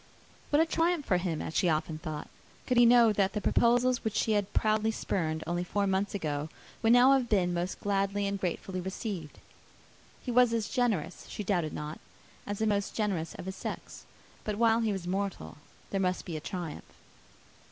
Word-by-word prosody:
What 295 - +3
a 325 - +5
triumph 330 -1 +1
for 185 - +2
him, 175 -3 -2
as 160 - -6
she 180 - +3
often 155 0 -1
thought, 155 -3 -5 0.4
could 250 - +1
he 240 0 +7
know 235 -2 +6
that 195 -1 +1
the 210 - -1
proposals 245 +3 +3
which 220 -2 -2
she 220 - +1
had 205 -2 +1
proudly 215 0 +2
spurned 160 -7 -2
only 175 +1 -1
four 200 +3 0
months 195 +1 0
ago 150 -4 -2 0.3
would 225 - +4
now 245 +2 +7
have 260 -3 +3
been 180 -4 +2 0.3
gladly 200 0 0
and 200 0 -2
gratefully 185 +1 -3
received! 190 -3 -5 0.9
He 250 - -3
was 245 -1 +5
as 225 -3 -1
generous, 215 - -1
she 210 - -5
doubted 175 -6 0
not, 150 +1 -5 0.5
as 205 0 -3
the 220 - 0
most 205 -2 0
generous 195 -7 -1
of - - -8
his 190 0 -5
sex. - - -7 0.4
But 210 -1 -3
while 230 0 +4
he 225 -2 +1
was 190 -3 -4
mortal, 185 - -3 0.3
there 195 - 0
must 185 -1 0
be 170 - -5
a 155 - -4
triumph. 170 -2 -6
200 Hz, 190 wpm, -30 LUFS, 175-225 Hz, 0.9 s, he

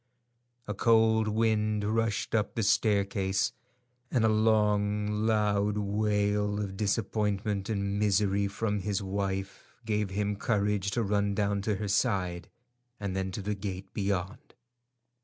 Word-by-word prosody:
A 105 - -2
cold 110 0 +3
wind 110 -1 +1
rushed 110 0 -1
up 105 -3 0
the 115 - 0
staircase, 100 -2 +1 0.6
and 120 -3 +2
a - - +4
long 105 -1 +2 0.2
loud 105 -1 +1
wail 105 0 0
of 100 -2 -4
disappointment 105 -1 -1
and 100 -1 -1
misery 100 -1 +2
from 105 +1 -2
his 100 0 -2
wife 95 0 -4
gave 105 -2 0
him 100 +1 -1
courage 105 -3 0
to 120 - +2
run 100 -1 0
down 100 -1 0
to 105 +1 0
her 105 +2 -3
side, 95 -5 0 0.5
and 100 -2 -3
then 95 0 -1
to 100 - -5
the 105 +2 -1
gate 95 -1 -6
beyond. 100 +7 -3
105 Hz, 135 wpm, -29 LUFS, 100-105 Hz, 0.6 s, a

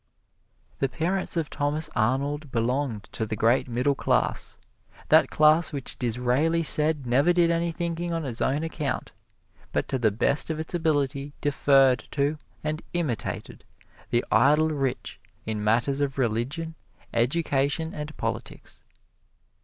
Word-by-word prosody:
The 135 - +1
parents 180 +6 -1
of 160 -3 -1
Thomas 150 +2 -1
Arnold 140 +5 0
belonged 120 -1 -1
to - - -2
the 110 0 -3
great 115 +5 +2
Middle 125 +4 +1
Class 135 - -1 0.5
that - - +6
class 155 +2 +4
which 140 -3 -2
Disraeli 125 +8 +1
said 150 -2 +2
never 135 +8 +3
did 170 -1 +3
any 170 0 0
thinking 170 +1 -3
on 165 -2 -2
its 125 -3 -5
own 145 +4 +1
account, 150 -5 -3 0.6
but - - -1
to 130 - -1
the 115 -2 +3
best 115 +10 0
of 160 -1 -2
its 160 - -6
ability 145 -4 0
deferred 135 -4 +3
to 145 +1 0 0.2
and 155 +1 -2
imitated 155 - -3 0.5
the 120 0 +1
idle 150 +7 +4
rich 135 -4 -3 0.3
in 110 -1 -3
matters 120 +6 +1
of 140 -1 -1
religion, 130 +7 -1 0.4
education 140 +4 +1
and 150 0 -7
politics. - - -5
145 Hz, 140 wpm, -26 LUFS, 125-160 Hz, 0.6 s, that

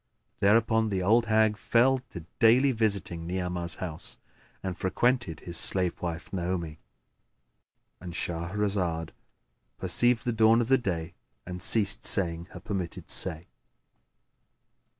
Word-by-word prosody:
Thereupon 110 +2 +3
the 95 -3 -2
old 115 +4 +3
hag 110 -1 +2
fell 130 +5 +2
to 85 -2 -9
daily 125 +5 +5
visiting 100 -7 -2
Ni'amah's 90 -1 -3
house 80 -4 -7 0.5
and 95 -2 -3
frequented 120 0 -1
his 85 -1 -7
slave 90 -2 -1
wife, 85 +1 -5
Naomi.— 85 -4 -3 1.2
And 90 - -8
Shahrazad 85 -1 -2 0.7
perceived 115 +6 +2
the 120 - 0
dawn 110 +1 +4
of 120 0 -1
day 85 -5 -3 0.3
and 90 0 -7
ceased 105 +1 +4
saying 85 -3 +2
her 90 - -12
permitted 95 -2 -5
say. 80 0 +2
95 Hz, 115 wpm, -27 LUFS, 85-110 Hz, 1.2 s, daily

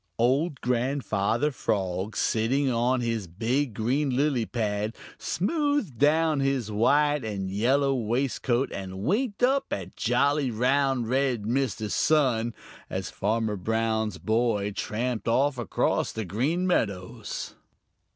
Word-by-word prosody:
Old 135 +5 +1
Grandfather 125 0 0
Frog, 95 -4 -2
sitting 130 +5 +1
on 120 +2 +1
his 115 -5 -2
big 115 - -1
green 130 +7 0
lily 130 -2 +1
pad, 105 -2 -2 0.2
smoothed 285 - -1
down 155 +1 +3
his 135 -5 0
white 145 +6 +3
and 100 -3 -3
yellow 135 +7 +2
waistcoat 125 +1 0
and 95 0 -6
winked 215 - 0
up 270 +2 +3
at 95 -2 -4
jolly, 140 +3 +1
round, 130 +1 +1
red 130 -3 +1
Mr. 120 -1 -1
Sun 125 -7 +2 0.3
as - - -4
Farmer 110 +1 -1
Brown's 110 0 -1
boy 110 +1 0
tramped 115 +4 -3
off 130 +3 +2
across 120 - 0
the 110 -1 -4
Green 140 - 0
Meadows. 100 - -2
120 Hz, 120 wpm, -27 LUFS, 110-140 Hz, 0.3 s, down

